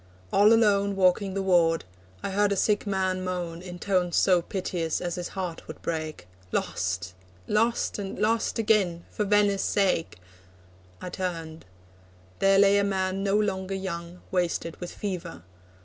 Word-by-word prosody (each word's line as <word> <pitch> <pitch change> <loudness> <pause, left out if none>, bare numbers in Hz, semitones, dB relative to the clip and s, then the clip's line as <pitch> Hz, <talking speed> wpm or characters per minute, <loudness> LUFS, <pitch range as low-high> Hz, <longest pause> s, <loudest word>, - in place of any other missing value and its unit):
All 205 +2 +6
alone 200 -3 +4
Walking 190 +1 +2
the 195 - -1
ward, 170 -3 +3 0.4
I - - -2
heard 205 +1 +2
a - - +2
sick 205 +2 +1
man 190 -1 0
moan, 175 -2 -4
In 180 -1 -8
tones 180 -2 0
so 180 -3 +4
piteous, 175 -3 -2
as 175 -1 -3
his 175 0 -4
heart 180 -3 -4
would - - -8
break: 155 - -4 0.2
'Lost, 90 0 -2 0.3
lost, 225 +1 +1
and 195 -1 -5
lost 220 +2 +1
again 205 -6 +1
for 210 - -1
Venice' 205 -1 +3
sake!' 195 -5 +1 0.8
I 180 - -6
turned. 165 -4 -5 0.7
There 195 0 +4
lay 200 0 +6
a - - +2
man 190 -1 -1
no 200 0 +1
longer 195 -2 -1
young, 175 -2 -5
Wasted 175 -2 -1
with 175 - -6
fever. 180 - -5
190 Hz, 150 wpm, -27 LUFS, 175-200 Hz, 0.8 s, All